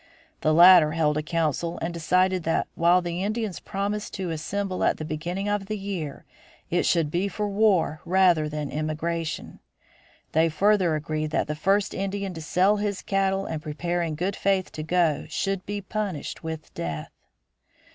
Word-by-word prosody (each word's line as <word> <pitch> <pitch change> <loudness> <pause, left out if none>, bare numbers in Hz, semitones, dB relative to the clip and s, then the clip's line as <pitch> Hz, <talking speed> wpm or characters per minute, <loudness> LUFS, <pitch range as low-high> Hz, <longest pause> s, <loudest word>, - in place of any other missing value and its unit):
The 155 - +2
latter 170 -1 +8
held 155 -2 +2
a 155 - 0
council 165 +1 -1
and 170 +1 -3
decided 185 +2 +2
that 165 0 0
while 175 +2 +3
the 175 +1 -3
Indians 215 -2 -2
promised 205 +2 -3
to 185 -4 -3
assemble 185 +4 -2
at - - +2
the 155 - -5
beginning 175 +6 -3
of 205 -1 -1
the 215 +1 -3
year 190 -8 -5 0.5
it 175 - +2
should 165 -4 +2
be 180 +4 0
for 210 +2 -3
war 195 -7 +2
rather 175 -4 +3
than 150 -1 -4
emigration. 155 +2 -3 0.7
They 160 +1 +3
further 185 0 +3
agreed 155 0 -2
that - - 0
the 150 - -3
first 195 +6 +1
Indian 195 0 -3
to 165 - -7
sell 185 +6 +2
his 205 -1 -2
cattle 195 0 0
and 160 -2 -4
prepare 170 +3 -2
in 165 -2 -2
good 185 +5 -2
faith 195 -2 0
to 155 - -6
go 160 -2 +1
should 195 -1 -2
be 205 0 -3
punished 200 -6 -4
with 160 -1 -6
death. 80 -2 -5
175 Hz, 170 wpm, -25 LUFS, 155-195 Hz, 0.7 s, latter